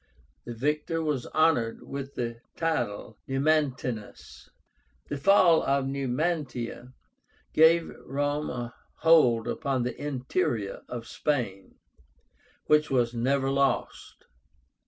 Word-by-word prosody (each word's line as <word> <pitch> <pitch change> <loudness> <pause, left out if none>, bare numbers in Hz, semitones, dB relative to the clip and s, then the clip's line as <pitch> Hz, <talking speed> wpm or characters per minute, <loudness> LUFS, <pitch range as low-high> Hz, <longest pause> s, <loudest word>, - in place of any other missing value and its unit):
The 120 - -6
victor 150 +6 -1
was 145 -5 -2
honored 155 -8 +1
with 140 0 -7
the 120 -1 -3 0.2
title 120 -11 -1
of 110 - -22
NUMANTÍNUS. 135 -5 -1 0.6
The 145 - -2
fall 170 +1 +5
of 140 0 +1
Numantia 135 -2 -2 0.6
gave 165 +1 +5 0.2
Rome 145 +2 -1
a 120 -1 -5 0.2
hold 125 -9 +4
upon 135 -3 -1
the 125 - -3
interior 130 - -2
of 120 -2 -6
Spain, 115 -10 -3 0.9
which 150 0 +3
was 120 -3 +1
never 135 +3 +1
lost. 140 0 -1
135 Hz, 105 wpm, -27 LUFS, 120-150 Hz, 0.9 s, fall